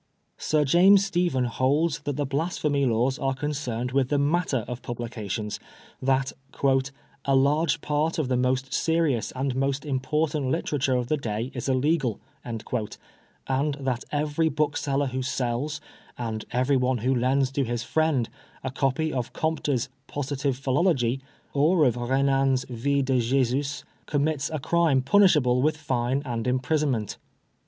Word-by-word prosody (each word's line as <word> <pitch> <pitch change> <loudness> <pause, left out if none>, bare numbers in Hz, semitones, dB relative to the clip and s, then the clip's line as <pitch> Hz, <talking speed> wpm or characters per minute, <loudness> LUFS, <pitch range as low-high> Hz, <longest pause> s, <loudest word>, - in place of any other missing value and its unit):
Sir 150 -1 +1
James 190 +7 +6
Stephen 175 -8 +1
holds 140 +7 +1
that 145 - -4
the 145 - 0
Blasphemy 145 -1 0
Laws 120 +3 +1
are 135 -1 0
concerned 130 -4 -3
with 130 -1 +1
the 145 - +2
matter 145 -4 +1
of 125 0 -5
publications, 110 -3 -4 0.4
that 135 0 +1 0.4
" 135 +1 -6
a 135 - +3
large 150 +4 +2
part 150 +2 0
of 155 -5 0
the 130 - +1
most 130 +1 0
serious 160 -8 +1
and 130 0 -2
most 135 +2 -1
important 145 +1 0
literature 135 0 0
of 125 -1 0
the 155 +5 0
day 115 -1 -3
is 125 +1 -4
illegal," 135 -3 +1 0.2
and 115 -2 -5 1.2
that 130 -3 -2
every 150 +2 +1
book 150 -1 0
seller 140 0 0
who 130 0 -3
sells, 130 +3 -2 0.4
and 110 -3 -4
everyone 130 +1 +1
who 130 - +3
lends 130 +2 +2
to 135 0 0
his 120 -1 -2
friend, 155 -5 +1 0.4
a 130 - -3
copy 140 +4 0
of 125 -3 -3
Comte's 150 -6 -1 0.2
Positive 140 -2 -2
Philosophy^ 135 -3 +1 0.3
or 155 +3 +4
of 125 - +3
Kenan's 135 +1 +1
Vi^ 135 +3 0
de 130 -1 +2
Jesus^ 135 +3 0 0.2
commits 145 0 0
a 155 - -2
crime 155 -2 +2
punishable 140 -7 +4
with 155 +2 +1
fine 130 -2 -1
and 120 -2 -3
imprisonment. 130 -3 0
135 Hz, 145 wpm, -26 LUFS, 125-150 Hz, 1.2 s, James